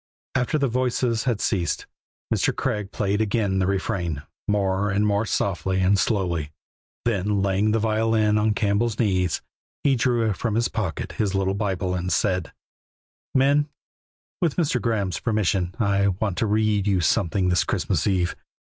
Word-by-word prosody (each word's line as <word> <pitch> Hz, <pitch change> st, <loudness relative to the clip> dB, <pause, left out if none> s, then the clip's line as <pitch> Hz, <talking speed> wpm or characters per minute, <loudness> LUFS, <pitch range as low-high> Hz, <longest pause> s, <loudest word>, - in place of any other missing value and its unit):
After 130 Hz, +4 st, +1 dB
the 140 Hz, -2 st, +1 dB
voices 125 Hz, -1 st, 0 dB
had 120 Hz, -5 st, 0 dB
ceased 90 Hz, -6 st, -1 dB, 0.5 s
Mr. -, -, +1 dB
Craig 105 Hz, -2 st, -2 dB
played 105 Hz, +1 st, 0 dB
again 100 Hz, -3 st, +1 dB
the 95 Hz, -, +1 dB
refrain, 90 Hz, -6 st, -2 dB, 0.2 s
more 100 Hz, -1 st, +1 dB
and 100 Hz, +1 st, +1 dB
more 105 Hz, +1 st, +1 dB
softly 95 Hz, -1 st, 0 dB
and 95 Hz, +1 st, +3 dB
slowly; 90 Hz, -8 st, 0 dB, 0.6 s
then 100 Hz, -3 st, +1 dB
laying 100 Hz, +2 st, +2 dB
the 110 Hz, -, +2 dB
violin 110 Hz, -1 st, +2 dB
on 105 Hz, 0 st, +1 dB
Campbell's 105 Hz, +2 st, +1 dB
knees, 90 Hz, -, +1 dB, 0.4 s
he 140 Hz, -2 st, +4 dB
drew 115 Hz, -3 st, +1 dB
from 110 Hz, +3 st, -2 dB
his 120 Hz, +1 st, +1 dB
pocket 95 Hz, -9 st, -3 dB
his 100 Hz, -2 st, -1 dB
little 95 Hz, 0 st, +1 dB
Bible 95 Hz, -3 st, -1 dB
and 90 Hz, 0 st, -2 dB
said: 90 Hz, -5 st, 0 dB, 0.8 s
"Men, 140 Hz, +3 st, +3 dB, 0.7 s
with 165 Hz, -5 st, +1 dB
Mr. 145 Hz, -8 st, +1 dB
Graeme's 100 Hz, -7 st, -1 dB
permission 95 Hz, -5 st, 0 dB
I 100 Hz, -2 st, +2 dB
want 100 Hz, 0 st, -1 dB
to 110 Hz, -, +1 dB
read 105 Hz, -1 st, +1 dB
you 95 Hz, -2 st, +2 dB
something 90 Hz, +2 st, +1 dB
this 90 Hz, -5 st, +3 dB
Christmas -, -, -1 dB
eve. 90 Hz, -3 st, +1 dB
100 Hz, 155 wpm, -24 LUFS, 95-110 Hz, 0.8 s, he